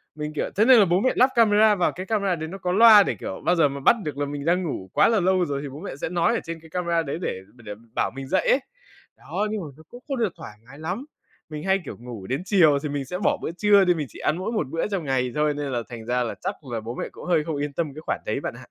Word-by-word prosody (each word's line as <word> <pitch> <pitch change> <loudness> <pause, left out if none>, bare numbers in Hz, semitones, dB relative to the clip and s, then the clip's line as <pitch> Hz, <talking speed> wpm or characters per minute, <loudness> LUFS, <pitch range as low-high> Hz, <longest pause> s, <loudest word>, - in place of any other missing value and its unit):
mình, 150 0 -4
kiểu - - -1
thế 215 +3 +4
nên 255 -3 +8
là 200 - +6
bố 175 +2 +2
mẹ 255 - +2
lắp 255 +2 +5
camera 215 -2 +5
vào, 180 - +1
cái 185 +1 -7
camera 200 -4 0
đấy 160 0 -5
nó 195 +4 -7
có 180 -1 -2
loa 215 0 +8
để, 120 - -2
kiểu, 95 - -7
bao 180 - +3
giờ 160 -4 +4
mà 140 0 -6
bắt 185 - +5
được 145 -2 -5
là 145 - -1
mình 145 0 -5
đang 180 +2 +2
ngủ 95 - -5
quá - - +5
là 225 -3 +3
lâu 185 0 +2
rồi 140 -2 -3
thì 145 - -6
bố 140 +3 -9
mẹ 190 -7 -6
sẽ - - -2
nói 175 +6 +1
ở - - 0
trên 165 0 -6
cái 160 0 -16
camera 170 -1 0
đấy 140 +2 -4
để 95 - -3 0.2
để 120 - -17
để 105 - -5 0.2
bảo - - 0
mình 135 0 -8
dậy 190 +5 +1
ấy. 270 - +5 0.6
Đó, 210 +1 -3
nhưng 215 -3 -2
mà 160 - -6
nó 160 - -15
cũng 245 +1 -13
không 275 -2 -2
được 220 -7 0
thoải 105 - -10
mái 140 +3 -13
lắm. 185 - -4 0.4
Mình 150 0 -6
hay, 190 0 +2
kiểu, - - -7
ngủ 120 -6 -9
đến 135 +6 -2
chiều 165 -9 +4
thì 150 - -2
mình 140 -1 -3
sẽ 180 +7 -4
bỏ 205 - +1
bữa - - -3
trưa 200 +1 +4
đi, 180 - +4
mình 150 -5 -4
chỉ - - -13
ăn 160 - 0
mỗi 190 +5 -3
một 210 - -1
bữa 165 +6 -1
trong 195 -5 -3
ngày 130 -3 0
thôi, 150 0 +2
nên 145 -2 -4
là 120 -1 -1
thành 115 -2 -8
ra 125 +1 0
là 115 - -4
chắc 195 +3 -3 0.2
là 115 - -1
bố 115 +3 -7
mẹ - - -4
cũng - - -11
hơi 170 -4 +2
không 160 -2 -3
yên 145 0 -3
tâm 155 -3 -2
cái 155 - -8
khoản - - -1
đấy - - -1
bạn - - -3
ạ. - - -12
165 Hz, 320 wpm, -24 LUFS, 140-195 Hz, 0.6 s, nên